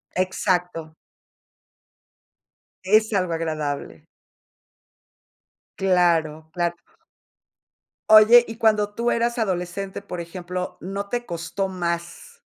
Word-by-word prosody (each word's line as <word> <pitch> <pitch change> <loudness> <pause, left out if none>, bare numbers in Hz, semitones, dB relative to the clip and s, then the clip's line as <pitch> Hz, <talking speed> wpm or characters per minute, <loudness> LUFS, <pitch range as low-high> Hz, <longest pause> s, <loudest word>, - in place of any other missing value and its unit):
Exacto. 180 -3 -1 1.9
Es 215 +3 +3
algo 180 -3 0
agradable. 155 -3 -4 1.7
Claro, 165 -4 +1
cla 175 -1 0 1.4
Oye, 220 +3 +8
y 225 - -7
cuando 215 -2 +2
tú 235 +2 0
eras 235 +1 0
adolescente, 190 -1 -3
por 180 -3 -6
ejemplo, 180 +1 -6
¿no 200 +2 -5
te 240 0 -3
costó 170 +3 -3
más? 175 - -5
185 Hz, 85 wpm, -23 LUFS, 170-215 Hz, 1.9 s, Oye